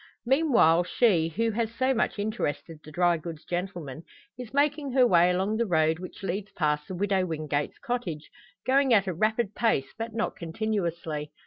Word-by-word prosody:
Meanwhile, 240 - +4
she, 180 -7 +3
who 225 +7 0
has 225 +1 -1
so 260 +2 +2
much 240 -2 0
interested 205 -7 -3
the 155 - -12
dry 175 +1 +2
goods 160 -1 -8
gentlemen, 175 -6 -4 0.3
is 250 -2 -9
making 285 -1 0
her 255 -1 +5
way 175 -5 +5
along 190 +4 0
the 235 0 0
road 160 -2 +2
which 185 +2 -9
leads 195 +2 -3
past 150 -4 0
the 185 - -5
Widow 195 0 +1
Wingate's 150 -3 -2
cottage, 240 - -4 0.3
going 265 -2 +4
at 200 -2 +3
a 185 - -2
rapid 215 +3 0
pace, 215 - 0
but 225 +1 -5
not 230 - -1
continuously. 170 -5 -3
190 Hz, 175 wpm, -27 LUFS, 165-230 Hz, 0.3 s, her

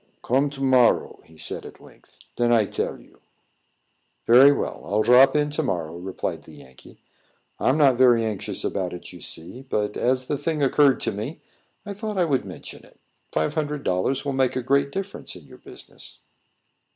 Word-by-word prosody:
"Come 135 +4 +1
to 140 -1 -10
morrow," 130 -3 +3
he 80 - -20 0.2
at - - -11
length - - -19
said. - - -22
"Den 120 0 +1
I 115 -3 +4
tell - - -3
you." - - -21 1.1
"Very 130 +4 +8
well. 145 - -3
I'll 105 +2 0
drop 125 +4 +6
in 150 0 +1
to 150 - -1
morrow," 85 - -3
replied 90 +2 -5
the - - -16
Yankee. 65 0 -16 0.6
"I'm 135 - +2
not 135 -5 +4
very 120 -3 +4
anxious 105 -3 -4
about 95 -3 -2
it, 90 - -10
you - - -12
see; 90 +10 -6
but, 105 -6 -2
as 130 +1 0
the 145 +1 -3
thing 160 -3 -1
occurred 140 0 +3
to - - -1
me, 110 +10 -6 0.5
I 205 - -5
thought 210 0 -5
I 180 - +3
would 140 -5 0
mention - - -10
it. - - -21 0.3
Five 80 0 -1
hundred 150 -2 -3
dollars 110 +10 -1
will 140 - -1
make 130 -1 +1
a 130 - -2
great 140 +2 +1
difference 195 +3 -6
in - - -13
your - - -16
business." - - -13
130 Hz, 190 wpm, -24 LUFS, 105-145 Hz, 1.1 s, Very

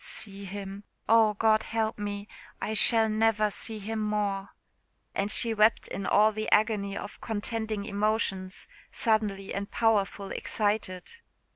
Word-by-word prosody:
See 200 -1 -8
him! 195 +1 -7 0.2
oh, 220 -2 +5
God 220 +1 +3
help 220 -1 -2
me! 205 0 -4 0.3
I 215 - -2
shall 225 +1 +5
never 215 -1 +2
see 220 +2 -4
him 220 +2 -4
more!" 205 -2 -1 0.6
And 200 +1 -1
she 230 +1 +3
wept 215 +1 +3
in 195 - -4
all 215 +2 +5
the 215 0 -3
agony 210 -2 +2
of 205 - -8
contending 220 -1 -2
emotions, 205 -2 -1 0.2
suddenly 210 -4 0
and 200 +1 -4
powerful 205 -3 +1
excited. 205 -4 -1
210 Hz, 135 wpm, -28 LUFS, 200-220 Hz, 0.6 s, oh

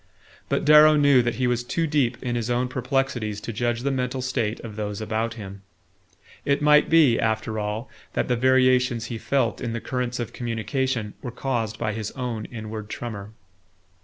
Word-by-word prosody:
But - - 0
Darrow 150 +1 +8
knew 145 -3 +5
that 120 0 -1
he 130 - 0
was 120 -1 +1
too 165 +7 -1
deep 145 -6 +1
in 125 -2 -2
his 120 0 -2
own 125 +1 +1
perplexities 125 -5 -1
to 115 +2 -5
judge 120 +2 -1
the 140 +2 0
mental 130 0 -2
state 120 -4 -1
of 110 -3 -8
those 105 -1 -4
about 110 +1 -2
him. 100 -3 -9 0.8
It 140 0 +1
might 150 0 +5
be, 155 -8 +5
after 110 0 -1
all, 105 +3 -3 0.3
that - - 0
the 125 - +2
variations 130 -1 +3
he 115 - -4
felt 140 +3 0
in 120 -2 -3
the 115 - -2
currents 125 0 -3
of 120 - -4
communication 120 -1 -2
were 125 - -5
caused 120 -3 -2
by 110 - -2
his 110 -1 -4
own 120 -4 -4
inward 110 -2 -7
tremor. 110 -3 -6
120 Hz, 185 wpm, -24 LUFS, 110-130 Hz, 0.8 s, Darrow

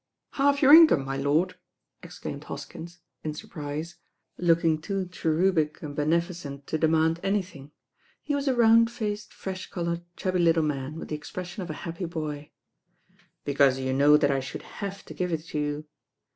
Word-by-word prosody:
"Half 280 +1 +2
your 280 +2 +8
income, 315 - +8
my 135 0 -3
lord 145 +7 +1 0.5
I" - - -10
exclaimed - - -7
Hoskins, 170 +2 -8 0.2
in 155 -1 -3
surprise, 150 +2 -6 0.4
looking 165 -2 +2
too 195 +2 -2
cherubic 160 -1 +1
and 145 -2 -6
beneficent 155 -2 -1
to 160 - -2
demand 160 +1 +2
anything. 185 -8 -3 0.5
He 295 - -2
was 285 0 -1
a 260 - +3
round 230 -1 +6
faced, 215 -3 -4
fresh 190 -1 -6
coloured, 170 -1 -2 0.2
chubby 185 -1 -1
little 165 -1 +4
man, 145 -1 -3
with - - -7
the 155 - -2
expression 175 +5 -7
of 180 - -6
a - - -3
happy 170 +2 -4
boy. 155 -3 -5 1.0
"Because 140 -2 +3
you 130 0 -2
know 145 +2 +6
that 145 -2 +2
I 135 - +1
should 135 0 -7 0.2
have 200 -1 -5
to - - -9
give 180 -1 -2
it 160 -1 -2
to 150 - -2
you. 150 +1 -2
165 Hz, 170 wpm, -27 LUFS, 150-185 Hz, 1.0 s, your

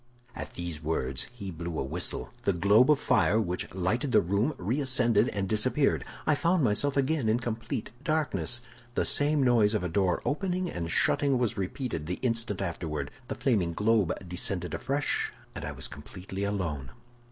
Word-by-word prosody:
"At - - -7
these 85 -3 -5
words 65 -5 -1
he 100 -6 -7
blew 85 -1 -5
a - - 0
whistle; 65 -4 0
the 100 - +1
globe 100 - +5
of 150 -3 +5
fire 90 +6 +3
which 90 -5 -2
lighted 100 +9 -1
the - - +6
room 100 - 0
reascended 125 0 +3
and 100 -1 -2
disappeared. 130 +7 +2 0.2
I 150 - +4
found 170 +2 +2
myself 130 +6 +1
again 140 -3 +1
in 115 +2 +2
complete 115 -2 -4
darkness. 150 -5 0 0.3
The - - +1
same 145 0 +2
noise 115 -4 +4
of 105 - 0
a 90 - -1
door 90 +1 +1
opening 180 +3 -1
and 85 -1 -4
shutting 140 - +3
was 120 -4 0
repeated 95 - -3
the 90 - -2
instant 115 -5 0
afterward; 85 -3 -4 0.2
the - - -4
flaming 100 -10 +1
globe 105 -1 +2 0.2
descended 90 0 -1
afresh, 140 +2 0 0.2
and - - -7
I - - -3
was - - -4
completely 90 +6 -6
alone. 80 -10 -2
105 Hz, 170 wpm, -29 LUFS, 90-130 Hz, 0.3 s, the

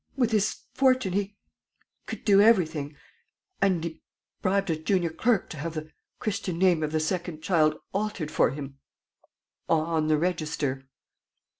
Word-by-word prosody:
With 245 -3 +2
his 210 -1 +1
fortune, 255 -7 +3
he 200 +1 -1 0.7
could - - -7
do 200 -1 +6
everything; 160 -9 +3 0.7
and 185 -4 +2
he 165 -1 -6 0.4
bribed 195 -1 +1
a - - +1
junior 170 +1 0
clerk 220 +4 +1
to 160 - -7
have 165 +3 -4
the 155 0 -6 0.3
Christian 200 -5 -3
name 180 -3 +3
of 150 -1 -1
the 155 - +1
second 165 -1 -3
child 155 -4 +3 0.2
altered 200 -6 -2
for - - +3
him 135 0 -7 0.9
on 160 -1 +1
the 155 -1 +3
register." 150 -5 -2
170 Hz, 145 wpm, -27 LUFS, 155-195 Hz, 0.9 s, do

